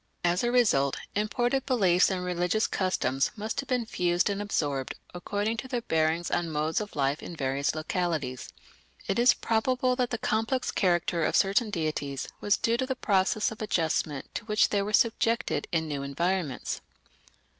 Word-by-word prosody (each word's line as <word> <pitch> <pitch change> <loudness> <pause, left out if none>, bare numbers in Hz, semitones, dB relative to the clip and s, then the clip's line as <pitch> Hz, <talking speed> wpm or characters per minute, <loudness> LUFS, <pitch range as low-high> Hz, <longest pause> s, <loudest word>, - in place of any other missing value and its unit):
As 175 +3 +2
a 240 - +1
result, 175 - +3 0.2
imported 240 +6 0
beliefs 190 -9 +4
and 185 -2 -2
religious 180 +4 +1
customs 135 -8 0
must 215 +1 -4
have 275 - -5
been 250 -3 +1
fused 175 -1 +1
and 200 0 -2
absorbed 145 -10 -2 0.2
according 205 +5 -2
to 260 - -5
their 245 -2 -3
bearing 160 -2 +1
on 175 -1 0
modes 155 +4 0
of 210 - -7
life 140 +1 0
in 175 - -7
various 140 0 -1
localities. 155 -5 -2 0.6
It 195 - 0
is 245 +1 +6
probable 250 +3 +1
that 250 -2 +1
the 235 - -2
complex 225 +4 0
character 175 -2 +1
of - - +1
certain 205 +3 +3
deities 155 -7 -3
was 205 - +2
due 230 +1 +1
to 260 - -1
the 265 - -1
process 205 -2 +1
of 220 - -9
adjustment 160 -7 -1
to 215 - -5
which 210 -1 +3
they 205 - +1
were 205 +1 -3
subjected 230 +1 +1
in 160 -2 0
new 145 -2 -3
environments. 155 +1 -2
190 Hz, 170 wpm, -28 LUFS, 160-225 Hz, 0.6 s, is